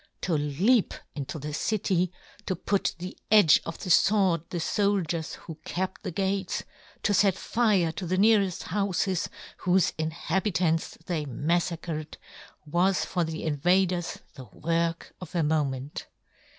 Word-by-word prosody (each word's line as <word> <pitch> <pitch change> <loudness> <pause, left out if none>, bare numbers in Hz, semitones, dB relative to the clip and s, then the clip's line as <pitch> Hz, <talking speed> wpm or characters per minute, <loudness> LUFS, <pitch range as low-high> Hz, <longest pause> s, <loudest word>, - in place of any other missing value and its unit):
To 180 - -1
leap 170 - +2 0.2
into 145 +1 -5
the 150 0 -5
city, 185 0 0 0.4
to 185 - 0
put 195 +3 -1
to - - 0
the 180 +2 -7
edge 205 -8 +7
of 165 - -5
the 180 - -3
fword 185 -4 +3
the 175 - -3
foldiers 175 -2 0
who 165 -2 -10
kept 185 +1 -3
the - - -4
gates, 190 +1 -1 0.4
to 205 - +2
fet 195 -1 +4
fire 205 -8 +2
to 180 +2 -5
the 185 +2 0
neareft 200 -3 +3
houfes, 190 -1 0 0.3
whofe 180 0 +2
inhabitants 165 +1 0
they 165 -5 -2
maffacred, 160 +2 -2 0.5
was 175 +5 +2
for 175 - 0
the 160 0 -4
invaders 175 +3 +1 0.2
the 130 - -10
work 165 - -2
of 180 -1 -9
a 170 - +2
moment. 145 -3 -1
175 Hz, 140 wpm, -27 LUFS, 160-190 Hz, 0.5 s, edge